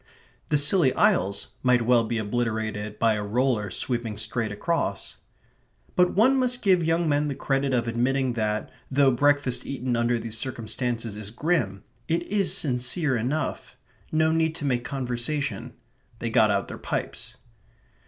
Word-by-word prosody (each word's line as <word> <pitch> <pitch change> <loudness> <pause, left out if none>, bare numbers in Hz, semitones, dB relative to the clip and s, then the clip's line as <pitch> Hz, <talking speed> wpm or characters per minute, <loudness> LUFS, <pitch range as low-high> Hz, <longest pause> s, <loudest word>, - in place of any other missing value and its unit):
The 150 - +2
Scilly 145 0 +5
Isles 100 +2 +2
might 125 -2 +3
well 120 -1 +4
be 115 +1 -2
obliterated 110 -1 -2
by 115 -1 +3
a 105 -1 -2
roller 110 -1 0
sweeping 115 +2 -3
straight 110 0 -2
across. 165 +11 -2 0.8
But 180 0 +3
one 255 +7 +5
must 250 -1 -1
give 185 -4 +4
young 165 +1 +1
men 145 0 +1
the 140 - -3
credit 135 0 0
of 120 -2 0
admitting 125 +2 0
that, 105 -2 -2 0.2
though 135 0 +4
breakfast 145 0 +2
eaten 130 -2 -2
under 120 +1 +1
these 115 -1 -3
circumstances 115 -2 -3
is 105 -1 -5
grim, 120 - -1 0.2
it 170 +1 0
is 195 +1 0
sincere 130 +2 +1
enough. 130 +7 -3 0.3
No 160 0 +3
need 160 0 +1
to 150 - -5
make 125 -3 0
conversation. 130 -1 -3 0.4
They 115 0 -4
got 110 -2 +4
out 100 -1 0
their - - -8
pipes. - - -5
125 Hz, 155 wpm, -25 LUFS, 115-150 Hz, 0.8 s, Scilly